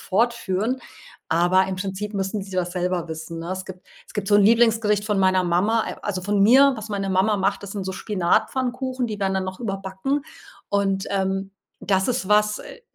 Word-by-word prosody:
fortführen, 230 +2 0 0.5
aber 175 +3 +3
im 190 -1 -3
Prinzip 195 +2 -4
müssen 195 +1 -2
sie 195 - -10
das 180 -1 -1
selber 180 -2 -1
wissen, 160 +1 -6
ne? 170 - -6
Es 185 0 -5
gibt 185 -1 -11 0.2
es - - -17
gibt 205 -1 -3
so 205 - +6
'n 205 - +5
Lieblingsgericht 225 -2 +3
von 210 -2 0
meiner 185 -1 +3
Mama 205 +6 +2
äh, - - -6
also 185 -3 -3
von 205 0 +1
mir, 265 +5 +6
was 220 0 -7
meine 195 -1 -2
Mama 195 +3 +2
macht. 200 +1 0
Das 200 - -7
sind 200 -2 -4
so 190 - -3
Spinatpfannkuchen, 245 +7 -1
die 210 - -5
werden 190 -1 0
dann 190 0 0
noch 185 +4 -6
überbacken 195 +6 -2 0.5
und, 195 -1 0
ähm, 195 0 -1 0.3
das 190 -1 +1
ist 240 -6 -1
was, 210 0 +3
äh, - - -11
195 Hz, 200 wpm, -23 LUFS, 190-215 Hz, 0.5 s, so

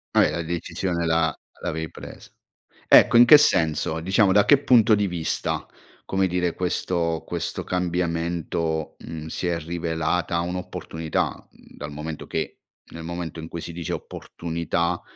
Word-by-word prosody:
Ah - - +7
eh, - - +2
la 85 - -2
decisione 85 +1 -2
la 80 -1 +1 0.2
l'avevi 80 -2 -3
presa. - - -11 0.6
Ecco 115 - +7
in 120 - +9
che 150 +5 +10
senso? 80 - +2
Diciamo 95 +3 +3
da 105 +2 +5
che 145 -2 +6
punto 115 -5 +5
di 105 -1 +1
vista, 85 -3 -2 0.4
come 95 0 +1
dire, 90 -1 0
questo 85 -2 -1
questo - - -3
cambiamento, 85 -2 -2
mhmm, 80 -1 -7
si 90 - -3
è 85 -1 0
rivelata 85 +1 -1
un'opportunità, 85 -2 -3 0.2
mhmm, - - -19
dal 75 - -6
momento 75 +1 -6
che, - - -4 0.3
nel 80 - -8
momento 85 0 -5
in 80 - -7
cui 85 - -6
si 85 - -7
dice 85 -2 -4
opportunità, 85 0 -3
85 Hz, 150 wpm, -24 LUFS, 80-90 Hz, 0.6 s, che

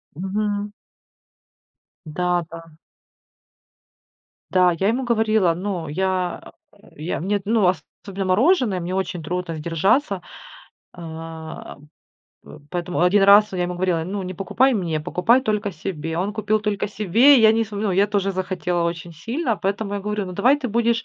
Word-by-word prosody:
Мгм. 205 +3 -2 1.3
Да-да. 165 -1 -3 1.7
Да, 180 -1 +4
я 195 - +1
ему 250 +4 0
говорила, 220 -6 +2
ну, 180 -2 -4
я 185 +2 -2 0.4
я 155 +4 -4
мне, 200 +4 -1
ну 215 -2 +2 0.4
особенно 195 -1 -5
мороженое, 215 - +2
мне 175 +2 -4
очень 190 -2 -3
трудно 180 +1 -3
сдержаться. 180 - 0 0.7
А, 160 -1 -8 0.7
п - - -13
поэтому 175 0 -3
1 185 +3 +4
раз, 205 +1 +6
я 180 -1 -1
ему 175 0 -2
говорила: 175 -2 0
ну, 195 +3 -4
не 185 0 -6
покупай 240 +9 +2
мне, 170 -7 -1
покупай 220 +11 +2
только 210 -4 -1
себе. 160 -2 -5
Он 195 +4 -1
купил 215 0 0
только 210 -1 -2
себе, 225 +8 +5
я 220 -1 +6
не 225 0 +1
см 210 0 -4
ну, - - 0
я 195 +3 +3
тоже 200 -1 -1
захотела 180 -2 -2
очень 170 0 -5
сильно, 230 - -2
поэтому 200 +1 -2
я 200 - -3
говорю: 210 0 -3
ну 185 - -7
давай 260 +10 +3
ты 260 -3 -4
будешь 230 +1 +1
190 Hz, 150 wpm, -22 LUFS, 175-210 Hz, 1.7 s, раз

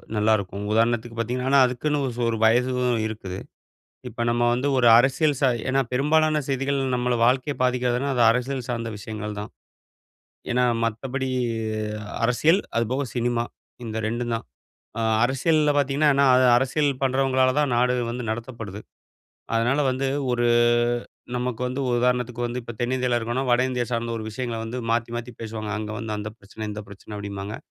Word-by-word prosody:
நல்லாருக்கும். 105 -2 +1
உதாரணத்துக்கு 115 +1 +1
பாத்தீங்கன்னா, 125 +3 -1
ஆனா 140 - +6
அதுக்குன்னு 145 +4 -1
ஒரு 125 - -3
சொ 120 - 0 0.2
வயசும் 125 +3 +3
உ 125 - +1 0.2
இருக்குது. 100 -4 -6 0.7
இப்ப 120 - -3
நம்ம 120 0 +1
வந்து 130 +4 0
ஒரு 120 -2 +4
அரசியல் 135 +4 +3
ச - - 0 0.3
ஏன்னா 135 +1 +3
பெரும்பாலான 155 +3 +2
செய்திகள் 135 +1 0 0.2
நம்மள 125 0 0
வாழ்க்கைய 130 +3 +1
பாதிக்கிறதுனா, 125 +1 +1
அது 120 - +4
அரசியல் 125 +1 -2
சார்ந்த 115 -1 -2
விஷயங்கள் 105 0 -6
தான். 105 - -7 1.0
ஏன்னா, 125 0 +3 0.2
மத்தபடி 130 +4 -2 1.0
அரசியல் 155 +10 +3 0.2
அதுபோக 125 +5 0
சினிமா 120 0 0 0.4
இந்த 110 0 -4
2ம் 120 +1 -2
தான். - - -8 0.5
அ - - 0 0.2
அரசியல்ல 150 +3 +2
பாத்தீங்கன்னா, 145 +2 +2
ஏன்னா 140 -1 +4
அது 130 0 +5
அரசியல் 140 +3 +1
பண்றவங்களால 130 -1 +2
தான் 140 -4 +1
நாடு 125 +1 +3 0.2
வந்து 125 0 -4
நடத்தப்படுது. 115 -3 -6 0.7
அதனால 120 +5 +2
வந்து 135 +1 -1 0.3
ஒரு 120 0 +1 0.9
நமக்கு 125 -1 -3
வந்து 130 +2 -3
ஒரு 120 - +2
உதாரணத்துக்கு 125 -1 0
வந்து, 120 +1 -4
இப்ப 120 -1 -8
தென்னிந்தியால 125 0 +1
இருக்கோனா 120 +3 -2
வடஇந்தியா 125 0 +1
சார்ந்த 115 0 -1
ஒரு 110 - -6
விஷயங்கள 115 0 -4
வந்து 115 +2 -5 0.2
மாத்தி 115 0 0
மாத்தி 120 +1 -6
பேசுவாங்க. 110 -1 -5
அங்க 105 0 -5
வந்து 110 -1 -4
அந்த 105 - -4
பிரச்சன, 105 +2 -8
இந்த 105 +1 -6
பிரச்சன 100 +1 -10
அப்டிம்பாங்க. 100 +1 -5
125 Hz, 155 wpm, -24 LUFS, 115-130 Hz, 1.0 s, ஆனா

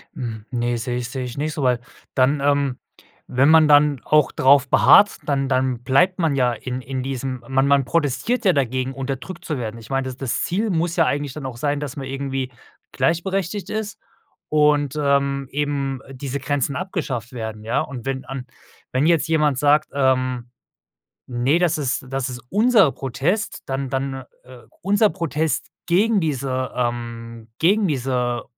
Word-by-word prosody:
Hm. 115 -7 -5
Ne, 120 -1 -1
sehe 120 +2 -3
ich 125 0 -4
sehe 130 0 -4
ich 125 +2 -7
nicht 150 +1 -2
so, 150 - -3
weil 125 -2 +2 0.4
dann, 135 +3 +3
ähm 140 -2 +1 0.5
wenn 130 +3 +4
man 160 -1 +7
dann 145 -3 +5
auch 155 -2 +3
drauf 135 +1 +4
beharrt, 205 - +6
dann 135 -2 0
dann 130 -2 0
bleibt 180 +10 +3
man 160 -5 +1
ja 125 -2 +2
in 125 +1 -5
in 130 0 -4
diesem 130 -1 -4
man 135 +1 +2
man 140 -2 +3
protestiert 170 - 0
ja 190 - +4
dagegen, 130 -2 0
unterdrückt 135 +5 -6
zu 150 -5 -2
werden. 115 -1 -5
Ich 110 - -13
meine, 135 0 0
das 130 0 -6
das 135 -4 -2
Ziel 205 +5 -1
muss 170 0 0
ja 165 -2 +4
eigentlich 145 -2 -1
dann 150 -2 -7
auch 130 -3 -6
sein, 145 +2 -1
dass 145 -3 -5
man 135 -2 -6
irgendwie 135 -1 -3 0.4
gleichberechtigt 190 +3 -1
ist 215 -1 -4 0.5
und, 150 -2 +3
ähm, 140 -1 +1
eben 140 -2 -2
diese 135 +1 -5
Grenzen 140 0 -1
abgeschafft 140 - -4
werden, 110 -3 -6
ja? 115 +3 0
Und 125 -3 -6
wenn 130 -1 -3
an 130 0 -6 0.4
wenn 130 +4 +1
jetzt 165 -1 +3
jemand 150 -4 +2
sagt, 150 +2 +3
ähm: 130 -3 +1 0.8
„Ne, 125 +6 +1
das 175 -3 +2
ist 135 -2 -2
das 135 0 -2
ist 125 -1 -7
unser 215 - +4
Protest. 150 - -2
Dann 135 0 -3
dann, 135 0 -3 0.2
äh 125 -1 -13 0.2
unser 205 +3 +3
Protest 160 -2 -2 0.2
gegen 205 +4 +3
diese, 130 -4 -2
ähm 115 -2 -4
gegen 200 +5 +3
diese 125 -4 -1
135 Hz, 170 wpm, -22 LUFS, 125-150 Hz, 0.8 s, man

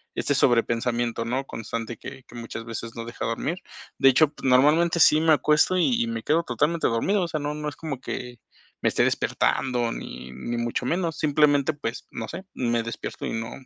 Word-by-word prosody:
este 145 - 0
sobrepensamiento, 120 -1 +1
¿no?, 130 +4 -1
constante 115 -1 -5
que 130 -1 -10
que 120 - -16
muchas 115 -1 -6
veces 115 0 -6
no 115 - -5
deja 120 - -5
dormir. 135 +9 -2 0.4
De 135 - +6
hecho 145 +3 +5
pues, 140 - -5
normalmente, 155 +7 +4
sí 155 - +7
me 160 -1 +5
acuesto, 150 +4 +3
y 235 +6 +2
y 235 - 0
me 230 0 -4
quedo 165 +3 +2
totalmente 150 +6 +1
dormido. 185 - +1
O - - -1
sea, 155 -2 -3
no 145 +1 -2
no 150 0 -4
es 145 - -11
como 150 -5 -5
que 125 -2 -6 0.4
me - - +3
esté - - +2
despertando, 120 -3 0
ni 65 0 -8
ni 120 - -4
mucho 120 +1 -2
menos. 170 +2 -1
Simplemente, 145 -1 +3
pues, 125 -5 -5
no 110 - -5
sé, 175 +8 -7
me 120 -2 0
despierto 115 +1 -6
y - - -3
no 115 0 -4
130 Hz, 200 wpm, -25 LUFS, 115-155 Hz, 0.4 s, sí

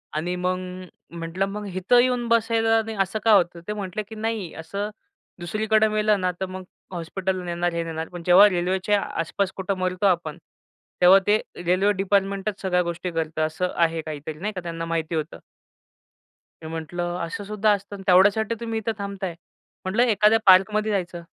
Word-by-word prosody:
आणि 175 +4 -1
मग 180 0 -1 0.6
म्हटलं, 170 +3 -2
मग 205 +1 -6
इथं 190 +7 +4
येऊन 245 -1 +1
बसायला 225 -1 +3
नाही 220 -1 -6
असं 195 +3 -1
का 225 - +4
होतं? 175 -3 +3
ते 210 - -2
म्हटले, 205 0 -4
की 220 +2 -11
नाही 220 -5 -3
असं 200 +6 -5 0.5
दुसरीकडं 215 +4 +1
मेलं 210 -1 +2
ना 185 0 +1
तर 190 - -1
मग 185 0 -7 0.3
हॉस्पिटल 185 +2 -3
नेणार, 175 0 -1
हे 170 0 -1
नेणार 160 0 -5
पण 175 -1 -8
जेव्हा 185 +4 +8
रेल्वेच्या 185 +3 0
आसपास 185 +4 -2
कुठं 190 0 -2
मरतो 185 +1 -1
आपण 170 -5 +1 0.6
तेव्हा 185 +2 +8
ते 210 +1 +4 0.2
रेल्वे 185 +4 +3
डिपार्टमेंटच 195 +1 0
सगळ्या 180 -2 +1
गोष्टी 170 +1 -4
करतं. 160 -1 -2
असं 170 +4 -2
आहे 165 -1 +1
काहीतरी 155 0 -7
नाही 210 +4 -3
का? 185 - -5
त्यांना 165 -1 -5
माहिती 165 0 -2
होतं. 155 0 -4 1.2
मी - - -6
म्हटलं 175 +2 -4
असं 170 +4 -6
सुद्धा 210 +1 +1
असतं 200 0 -6
तेवढ्यासाठी 205 +4 +4
तुम्ही 225 -1 -3
इथं 220 +1 -2
थांबत 200 -1 -6
आहे. 175 -3 -2 0.5
म्हटलं 210 +6 +2
एखाद्या 220 -1 +4
पार्कमध्ये 210 +3 +5
जायचं. 175 -3 -3
190 Hz, 170 wpm, -24 LUFS, 175-210 Hz, 1.2 s, जेव्हा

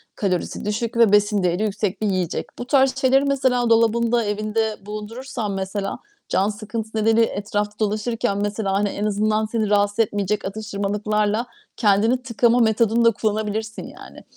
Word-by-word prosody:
kalorisi 185 0 -2
düşük 225 +2 -2
ve 230 -3 +5
besin 205 -1 +3
değeri 180 +3 +1
yüksek 205 -2 -2
bir 215 - +1
yiyecek. 185 -4 -1
Bu 245 - -4
tarz 265 -1 +3
şeyleri 270 +1 +3
mesela 260 -3 +1
dolabında, 230 +1 +3
evinde 215 +1 -1
bulundurursan, 215 +2 -5
mesela, 195 +1 -3 0.3
can 195 +3 +2
sıkıntısı 220 +1 -5
nedeniyle 225 +1 +4
etrafta 210 0 -3
dolaşırken, 215 -1 -1
mesela, 205 -1 -1
hani, 200 +1 +1
en 205 +2 -3
azından 215 +1 +1
seni 215 -1 -1
rahatsız 205 +1 +1
etmeyecek 205 -1 0
atıştırmalıklarla 210 +1 -1 0.3
kendini 225 +4 +3
tıkama 240 0 +2
metodunu 230 +1 +3
da 230 - +7
kullanabilirsin 215 +1 -2
yani. - - -13
215 Hz, 145 wpm, -22 LUFS, 205-230 Hz, 0.3 s, da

